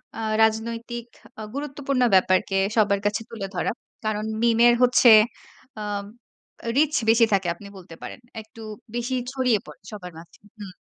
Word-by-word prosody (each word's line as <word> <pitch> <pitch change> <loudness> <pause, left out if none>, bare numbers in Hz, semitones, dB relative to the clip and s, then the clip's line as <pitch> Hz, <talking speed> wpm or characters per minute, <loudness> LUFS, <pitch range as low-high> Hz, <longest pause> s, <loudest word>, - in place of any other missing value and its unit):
অ্যা 225 - -5 0.2
রাজনৈতিক 230 +2 -1 0.3
আ - - -6
গুরুত্বপূর্ণ 280 -2 -2
ব্যাপারকে 185 +1 +2 0.2
সবার 200 -2 +3
কাছে 205 +2 0
তুলে 210 -4 -6
ধরা। - - 0 0.3
কারণ 215 0 -1 0.2
মিমের 235 0 +5
হচ্ছে 250 0 +6 0.7
আব 205 -1 -4 0.7
রিচ 300 +1 +3 0.2
বেশি 230 +1 +6
থাকে 190 -2 +1
আপনি 200 +4 -13
বলতে 175 -3 -12
পারেন। - - -8 0.2
একটু 220 +1 -15 0.3
বেশি 240 +2 -2 0.2
ছড়িয়ে 255 -5 +1
পড়ে 150 -3 -14
সবার 185 -4 -8
মাঝে। 165 +1 -15 0.2
হুম। 200 -3 -8
220 Hz, 145 wpm, -24 LUFS, 200-240 Hz, 0.7 s, হচ্ছে